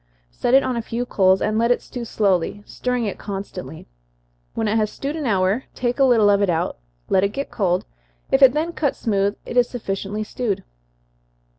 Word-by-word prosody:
Set 240 Hz, -, +1 dB
it 275 Hz, -, +6 dB
on 255 Hz, -, -1 dB
a 235 Hz, -, -1 dB
few 235 Hz, +2 st, -3 dB
coals, 190 Hz, -4 st, +3 dB
and 215 Hz, +1 st, +1 dB
let 235 Hz, +1 st, +2 dB
it 245 Hz, -, +3 dB
stew 245 Hz, -, -7 dB
slowly, 205 Hz, -3 st, 0 dB
stirring 250 Hz, -2 st, -2 dB
it 200 Hz, -, -4 dB
constantly. 195 Hz, -5 st, -7 dB, 0.7 s
When 225 Hz, -, 0 dB
it 210 Hz, -, +1 dB
has 215 Hz, -1 st, +1 dB
stewed 280 Hz, +6 st, -4 dB
an 305 Hz, -4 st, -3 dB
hour, 195 Hz, +3 st, +1 dB
take 245 Hz, +1 st, -1 dB
a -, -, +6 dB
little 230 Hz, -5 st, +5 dB
of 200 Hz, 0 st, +3 dB
it 200 Hz, -, +2 dB
out, 165 Hz, -, -1 dB, 0.3 s
let 190 Hz, -, +3 dB
it 200 Hz, -, +2 dB
get 275 Hz, +3 st, -4 dB
cold 185 Hz, -4 st, 0 dB, 0.5 s
if 270 Hz, -, +3 dB
it 260 Hz, -2 st, +8 dB
then 325 Hz, +3 st, -1 dB
cuts 290 Hz, -5 st, -1 dB
smooth, 200 Hz, -2 st, 0 dB
it 245 Hz, -, -4 dB
is 245 Hz, -1 st, +4 dB
sufficiently 205 Hz, -2 st, -3 dB
stewed. 215 Hz, -2 st, -3 dB
215 Hz, 200 wpm, -22 LUFS, 195-250 Hz, 0.7 s, it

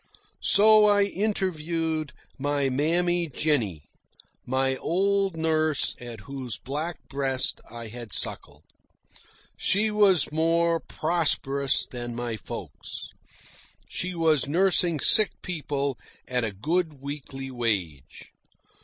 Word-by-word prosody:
So 215 Hz, +1 st, +6 dB
I 205 Hz, -1 st, +4 dB
interviewed 165 Hz, -6 st, -2 dB, 0.3 s
my 145 Hz, 0 st, 0 dB
Mammy 170 Hz, +5 st, +1 dB
Jennie, 125 Hz, -, 0 dB, 0.6 s
my 130 Hz, +1 st, +1 dB
old 195 Hz, +3 st, 0 dB
nurse 155 Hz, -2 st, +1 dB
at 120 Hz, -3 st, -9 dB
whose 130 Hz, -2 st, -6 dB
black 150 Hz, +6 st, -4 dB
breast 135 Hz, -2 st, -1 dB
I 115 Hz, 0 st, -8 dB
had 115 Hz, -1 st, -9 dB
suckled. -, -, 0 dB, 0.9 s
She 215 Hz, +3 st, +2 dB
was 200 Hz, -8 st, +4 dB
more 165 Hz, +1 st, +2 dB
prosperous 145 Hz, -5 st, 0 dB
than 120 Hz, -1 st, -6 dB
my 120 Hz, -1 st, -3 dB
folks. 105 Hz, -, -8 dB, 0.8 s
She 185 Hz, 0 st, -3 dB
was 160 Hz, -5 st, +2 dB
nursing 175 Hz, 0 st, +3 dB
sick 215 Hz, +8 st, +5 dB
people 140 Hz, -6 st, -3 dB, 0.3 s
at 125 Hz, -1 st, -1 dB
a 110 Hz, -, -1 dB
good 160 Hz, -, -1 dB
weekly 135 Hz, -2 st, -6 dB
wage. 95 Hz, -, -3 dB
150 Hz, 105 wpm, -26 LUFS, 130-175 Hz, 0.9 s, So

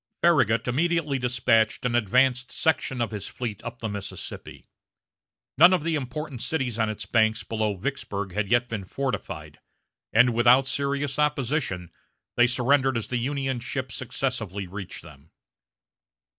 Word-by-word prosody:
Farragut 130 Hz, -9 st, +3 dB
immediately 150 Hz, +1 st, +1 dB
despatched 120 Hz, -2 st, +2 dB
an 125 Hz, -, +1 dB
advance 125 Hz, +3 st, +3 dB
section 135 Hz, -5 st, 0 dB
of 115 Hz, -, -1 dB
his 105 Hz, -2 st, -5 dB
fleet 115 Hz, -6 st, -5 dB
up 115 Hz, 0 st, -6 dB
the 115 Hz, -, -2 dB
Mississippi. 100 Hz, -2 st, -7 dB, 0.9 s
None 175 Hz, +3 st, +9 dB
of 180 Hz, -5 st, +1 dB
the 165 Hz, 0 st, 0 dB
important 140 Hz, -2 st, -4 dB
cities 130 Hz, -8 st, -1 dB
on 110 Hz, -1 st, +2 dB
its 110 Hz, -, -5 dB
banks 110 Hz, -1 st, +2 dB
below 110 Hz, -2 st, -1 dB
Vicksburg 100 Hz, -4 st, -4 dB
had 105 Hz, 0 st, -1 dB
yet 120 Hz, +1 st, +3 dB
been 110 Hz, -4 st, -4 dB
fortified, 135 Hz, +7 st, -4 dB, 0.5 s
and, 120 Hz, +2 st, +5 dB
without 120 Hz, +3 st, +5 dB
serious 140 Hz, +1 st, -2 dB
opposition, 140 Hz, -, -1 dB, 0.4 s
they 120 Hz, 0 st, +5 dB
surrendered 130 Hz, +1 st, +2 dB
as 115 Hz, -, -4 dB
the 125 Hz, -, 0 dB
Union 135 Hz, 0 st, -1 dB
ships 125 Hz, 0 st, -4 dB
successively 115 Hz, -6 st, -3 dB
reached 95 Hz, +1 st, -7 dB
them. 70 Hz, +3 st, -15 dB
125 Hz, 145 wpm, -26 LUFS, 110-140 Hz, 0.9 s, None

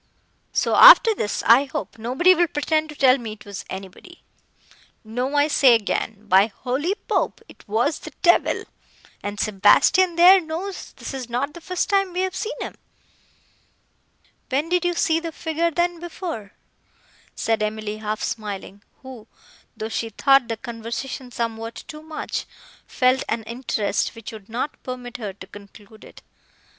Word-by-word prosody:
So -, -, +1 dB
after -, -, +9 dB
this, 210 Hz, -, -3 dB
I 250 Hz, +5 st, +6 dB
hope 265 Hz, -, -6 dB
nobody 260 Hz, +11 st, +4 dB
will 350 Hz, -1 st, +2 dB
pretend 310 Hz, +1 st, -1 dB
to 300 Hz, -, -9 dB
tell 270 Hz, -1 st, +4 dB
me 225 Hz, -3 st, -6 dB
it 215 Hz, -, -15 dB
was 200 Hz, -1 st, -7 dB
anybody. 195 Hz, -, -10 dB, 0.8 s
No, 250 Hz, +6 st, -3 dB
I 290 Hz, +1 st, +4 dB
say 265 Hz, -5 st, +5 dB
again, 215 Hz, -1 st, -2 dB
by 195 Hz, +2 st, +5 dB
holy 260 Hz, -, -2 dB
Pope! -, -, 0 dB
it -, -, -18 dB
was 235 Hz, +9 st, 0 dB
the -, -, -9 dB
devil, 345 Hz, -1 st, +3 dB, 0.6 s
and 205 Hz, 0 st, -5 dB
Sebastian, 220 Hz, -, +4 dB
there, 365 Hz, +3 st, +7 dB
knows 345 Hz, +4 st, -6 dB
this -, -, -8 dB
is 255 Hz, -3 st, -6 dB
not 265 Hz, +5 st, -2 dB
the 340 Hz, -, -11 dB
first 365 Hz, +1 st, -2 dB
time 390 Hz, -2 st, +1 dB
we 365 Hz, -, -1 dB
have 375 Hz, -1 st, -2 dB
seen 460 Hz, +3 st, -4 dB
him." -, -, -5 dB, 1.8 s
"When 285 Hz, +5 st, -1 dB
did 355 Hz, 0 st, +1 dB
you 350 Hz, 0 st, 0 dB
see 325 Hz, -2 st, +2 dB
the 330 Hz, 0 st, -5 dB
figure, 320 Hz, +1 st, -1 dB
then, 345 Hz, +1 st, -1 dB
before?" 330 Hz, -, -7 dB, 0.8 s
said 225 Hz, -1 st, 0 dB
Emily 215 Hz, 0 st, -3 dB
half 215 Hz, 0 st, -4 dB
smiling, 205 Hz, -2 st, -5 dB, 0.2 s
who, 250 Hz, -4 st, -11 dB, 0.5 s
though 220 Hz, 0 st, -4 dB
she 225 Hz, 0 st, -3 dB
thought 270 Hz, +3 st, +3 dB
the 225 Hz, -1 st, -3 dB
conversation 235 Hz, +2 st, -6 dB
somewhat 230 Hz, -1 st, -4 dB
too 305 Hz, 0 st, -9 dB
much, 315 Hz, 0 st, -5 dB, 0.4 s
felt 255 Hz, 0 st, +2 dB
an 225 Hz, 0 st, -1 dB
interest, 230 Hz, -2 st, -2 dB
which 225 Hz, -1 st, -9 dB
would 215 Hz, -2 st, -12 dB
not 245 Hz, +6 st, -4 dB
permit 250 Hz, -1 st, -7 dB
her 210 Hz, -4 st, -5 dB
to 190 Hz, -1 st, -12 dB
conclude 205 Hz, +2 st, -15 dB
it. -, -, -15 dB
255 Hz, 160 wpm, -22 LUFS, 220-325 Hz, 1.8 s, after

